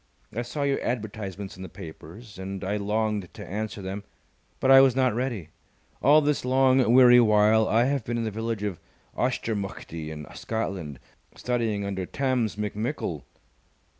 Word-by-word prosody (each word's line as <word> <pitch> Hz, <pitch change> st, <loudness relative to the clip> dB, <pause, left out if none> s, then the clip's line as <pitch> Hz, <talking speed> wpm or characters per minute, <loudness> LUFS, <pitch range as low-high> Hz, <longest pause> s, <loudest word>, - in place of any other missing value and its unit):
I 120 Hz, -, -1 dB
saw 140 Hz, +5 st, -4 dB
your 140 Hz, -1 st, 0 dB
advertisements 105 Hz, -5 st, -4 dB
in -, -, -10 dB
the 95 Hz, -, -7 dB
papers, 90 Hz, +6 st, -11 dB
and 95 Hz, +1 st, -5 dB
I 100 Hz, +2 st, -1 dB
longed 105 Hz, -2 st, -1 dB
to -, -, -8 dB
answer 105 Hz, +1 st, -4 dB
them, 95 Hz, +2 st, -5 dB, 0.6 s
but 135 Hz, -, +3 dB
I 135 Hz, 0 st, +10 dB
was 135 Hz, -2 st, +4 dB
not 130 Hz, -3 st, +2 dB
ready. 115 Hz, -, -3 dB, 0.5 s
All 150 Hz, +2 st, +6 dB
this 150 Hz, -1 st, 0 dB
long, 130 Hz, -1 st, +3 dB
weary 125 Hz, -1 st, +8 dB
while 110 Hz, -1 st, +4 dB
I 115 Hz, +2 st, +3 dB
have 135 Hz, -1 st, 0 dB
been 120 Hz, +1 st, -3 dB
in 115 Hz, -, -1 dB
the 110 Hz, -, -2 dB
village 110 Hz, 0 st, -3 dB
of 100 Hz, -5 st, -3 dB, 0.4 s
Auchtermuchtie, 100 Hz, -10 st, -3 dB
in 75 Hz, -1 st, -7 dB
Scotland, 95 Hz, -, -4 dB, 0.4 s
studying 115 Hz, -5 st, -1 dB
under 95 Hz, -2 st, -3 dB
Tamms 130 Hz, -6 st, 0 dB
McMickle." 105 Hz, +2 st, -3 dB
110 Hz, 160 wpm, -26 LUFS, 100-125 Hz, 0.6 s, I